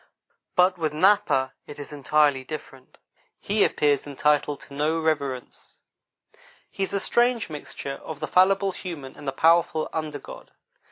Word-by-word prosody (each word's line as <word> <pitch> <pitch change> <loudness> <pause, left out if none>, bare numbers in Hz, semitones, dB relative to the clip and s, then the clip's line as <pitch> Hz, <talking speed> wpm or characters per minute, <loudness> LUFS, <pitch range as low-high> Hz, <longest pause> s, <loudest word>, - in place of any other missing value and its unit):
But 180 0 +3
with 155 -2 -1
Napa 160 -6 +3
it 145 - -9
is 145 0 -8
entirely 145 -1 +2
different; 135 -2 -9 0.4
he 205 +1 +1
appears 145 -1 +1
entitled 145 0 +1
to 140 - -13
no 155 +3 0
reverence; 140 -6 -3 0.9
he - - -8
is 195 - -1
a 200 - +1
strange 240 -3 +1
mixture 140 -2 -7
of 155 -2 -7
the - - -3
fallible 195 +1 +3
human 160 -8 -8
and 145 - -11
the - - +1
powerful 160 +2 +3
under 155 -2 -3
god. 140 - -12
150 Hz, 150 wpm, -25 LUFS, 140-180 Hz, 0.9 s, But